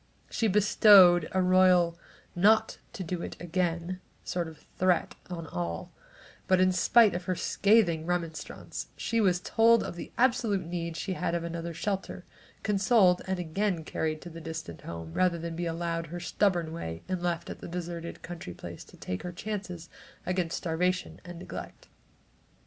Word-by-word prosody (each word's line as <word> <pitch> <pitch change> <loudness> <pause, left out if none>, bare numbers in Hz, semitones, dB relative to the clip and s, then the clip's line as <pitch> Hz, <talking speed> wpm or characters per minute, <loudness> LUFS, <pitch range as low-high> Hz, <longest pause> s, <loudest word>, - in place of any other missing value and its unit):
She 225 - +1
bestowed 195 -4 +6
a 190 0 +2
royal 180 -2 +4 0.4
"not 220 +5 +3
to 210 -5 -5
do 175 0 -4
it - - -6
again" 175 +1 -2 0.2
sort 175 -2 -2
of 160 -1 -13
threat 185 -1 +2 0.2
on 170 -2 -5
all, 85 - -4 0.6
but 185 -1 +4
in 185 0 +4
spite 215 +3 +5
of 175 +1 -4
her 185 - 0
scathing 180 -5 +2
remonstrance, 170 -2 -4
she 230 -1 0
was 180 -4 +3
told 230 +4 +4
of - - -5
the 175 - -8
absolute 235 -7 +2
need 170 -1 -4
she 190 - -3
had 170 -1 -1
of 170 - -2
another 170 0 -5
shelter, 195 +1 -3 0.4
consoled 200 -2 +4
and 190 0 -1
again 180 +1 -1
carried 155 0 -2
to 175 - -9
the 165 +1 -9
distant 160 - -7
home, 80 -1 -7
rather 180 -2 +2
than 165 0 -5
be 175 +1 -2
allowed 165 0 -2
her 175 +2 -6
stubborn 175 -1 0
way 80 - -6
and 185 -1 -2
left 170 -1 -2
at - - -8
the - - -8
deserted 170 -1 -6
country 165 - -7
place - - -9
to - - -17
take 90 - -5
her 180 - -5
chances 180 -3 -5 0.4
against 180 -2 -1
starvation 180 +2 -1
and 175 -1 -9
neglect. 180 - -9
175 Hz, 165 wpm, -29 LUFS, 165-185 Hz, 0.6 s, bestowed